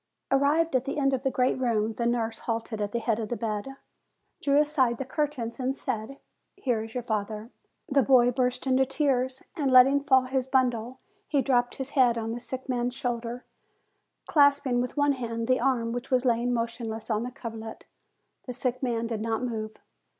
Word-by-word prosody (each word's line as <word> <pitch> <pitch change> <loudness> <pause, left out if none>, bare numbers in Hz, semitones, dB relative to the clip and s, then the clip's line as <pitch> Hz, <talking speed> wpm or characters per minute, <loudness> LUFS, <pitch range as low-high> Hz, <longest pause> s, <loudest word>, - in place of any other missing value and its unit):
Arrived 290 +3 +3
at 255 0 +1
the 275 - -3
end 275 -2 +2
of 260 - 0
the 265 - +1
great 255 0 +1
room, 225 -3 +1
the 235 +2 -1
nurse 230 -2 -1
halted 225 -1 -3
at 205 0 -2
the 235 - -1
head 230 -1 0
of 220 0 -4
a - - 0
bed, 225 +3 -4 0.7
drew 280 0 +3
aside 290 -5 +2
the 270 - -4
curtains 265 -5 -3
and 260 +1 -1
said, 225 +1 -4 0.4
"Here 245 - 0
is 225 +1 -9
your 250 - -2
father." 215 +1 -3 0.4
The 275 -3 +3
boy 245 -2 +5
burst 250 +1 -1
into 265 0 +3
tears, 265 -2 0
and 290 -6 0
letting 260 +2 +6
fall 265 -2 +5
his 260 0 -1
bundle, 250 -2 0 0.3
he 285 -3 +1
dropped 245 -2 +1
his 265 +1 -4
head 245 -4 +4
on 225 0 -3
the 235 - -4
sick 255 +2 -6
man's 245 -1 -1
shoulder, 240 -2 -3 0.8
clasp 285 -1 +4
ing 245 -2 +1
with 250 +4 -4
one 285 0 +3
hand 230 -3 -4
the 255 0 +3
arm 235 -4 +1
which 245 +1 -5
was 255 0 +2
lying 240 0 +2
motion 230 -1 -2
less 220 +1 -5
on 215 0 +1
the 245 - -3
coverlet. 225 -3 -8 0.6
The 250 - -4
sick 255 0 -2
man 235 -3 -1
did 225 -2 -3
not 225 +1 -1
move. 220 -3 -4
245 Hz, 200 wpm, -27 LUFS, 230-265 Hz, 0.8 s, letting